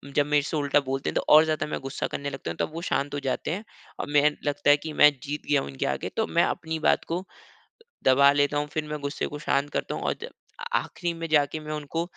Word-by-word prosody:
जब 145 Hz, -, +4 dB
मेरे 150 Hz, 0 st, +3 dB
से 155 Hz, -, -2 dB
उल्टा 145 Hz, 0 st, +3 dB
बोलते 135 Hz, +1 st, -1 dB
हैं -, -, -4 dB
तो -, -, +2 dB
और 155 Hz, +1 st, +9 dB
ज़्यादा 155 Hz, -1 st, -1 dB
मैं -, -, -3 dB
गुस्सा 135 Hz, 0 st, -3 dB
करने 140 Hz, 0 st, -4 dB
लगता 135 Hz, -11 st, -5 dB
हूँ 85 Hz, -, -8 dB
तब -, -, -2 dB
वो 165 Hz, -, -5 dB
शांत 145 Hz, -4 st, -1 dB
हो 145 Hz, -, -1 dB
जाते 135 Hz, +2 st, -2 dB
हैं, 195 Hz, +6 st, -3 dB, 0.4 s
और -, -, -3 dB
मैं 145 Hz, -1 st, +5 dB, 0.2 s
लगता 145 Hz, 0 st, +1 dB
है 145 Hz, -, +7 dB
कि 155 Hz, +2 st, -7 dB
मैं 150 Hz, -, +8 dB
जीत 150 Hz, +1 st, -4 dB
गया 145 Hz, -, +4 dB
हूँ 70 Hz, -, -6 dB
इनके 70 Hz, -, -3 dB
आगे -, -, -2 dB
तो -, -, +2 dB
मैं -, -, +3 dB
अपनी 160 Hz, 0 st, -2 dB
बात -, -, +2 dB
को 175 Hz, +3 st, -2 dB, 0.8 s
दबा 140 Hz, +2 st, +6 dB
लेता 145 Hz, 0 st, +2 dB
हूँ 145 Hz, 0 st, -1 dB
फिर 155 Hz, -, -1 dB
मैं 150 Hz, 0 st, -3 dB
गुस्से 140 Hz, 0 st, -2 dB
को 145 Hz, -, -7 dB
शांत 145 Hz, -1 st, 0 dB
करता -, -, -2 dB
हूँ -, -, -5 dB
और -, -, +1 dB
ज 475 Hz, -, -6 dB, 0.5 s
आखिरी 175 Hz, -1 st, -2 dB
में 165 Hz, 0 st, -5 dB
जाके 150 Hz, 0 st, +2 dB
मैं 155 Hz, 0 st, -7 dB
उनको 150 Hz, +2 st, -3 dB
145 Hz, 260 wpm, -26 LUFS, 140-155 Hz, 0.8 s, और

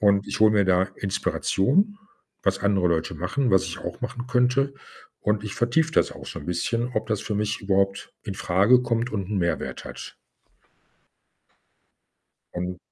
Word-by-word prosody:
und 100 Hz, -1 st, +3 dB
ich -, -, -3 dB
hole 110 Hz, 0 st, +6 dB
mir 100 Hz, -2 st, +4 dB
da 95 Hz, 0 st, +3 dB
Inspiration, 140 Hz, -, +1 dB, 0.5 s
was -, -, +1 dB
andere 100 Hz, -2 st, +2 dB
Leute 85 Hz, +1 st, 0 dB
machen, 115 Hz, -, -1 dB
was 95 Hz, 0 st, +4 dB
ich 85 Hz, -, -5 dB
auch 90 Hz, -, -6 dB
machen 125 Hz, 0 st, -5 dB
könnte. 125 Hz, +2 st, +2 dB, 0.5 s
Und 105 Hz, 0 st, 0 dB
ich 105 Hz, -, -5 dB
vertiefe 150 Hz, +7 st, +2 dB
das -, -, +2 dB
auch -, -, -11 dB
schon 75 Hz, -, -7 dB
bisschen, 115 Hz, +8 st, -1 dB
ob 110 Hz, +1 st, -1 dB
das 110 Hz, -2 st, 0 dB
für 105 Hz, -, -3 dB
mich 105 Hz, +1 st, -1 dB
überhaupt 100 Hz, 0 st, 0 dB
infrage 100 Hz, +4 st, +3 dB
kommt 120 Hz, 0 st, -1 dB
und 100 Hz, -3 st, -3 dB
'n 105 Hz, -2 st, -1 dB
Mehrwert 85 Hz, -1 st, -2 dB
hat. -, -, -9 dB, 2.4 s
Ähm. 90 Hz, +1 st, -3 dB
105 Hz, 160 wpm, -25 LUFS, 95-120 Hz, 2.4 s, hole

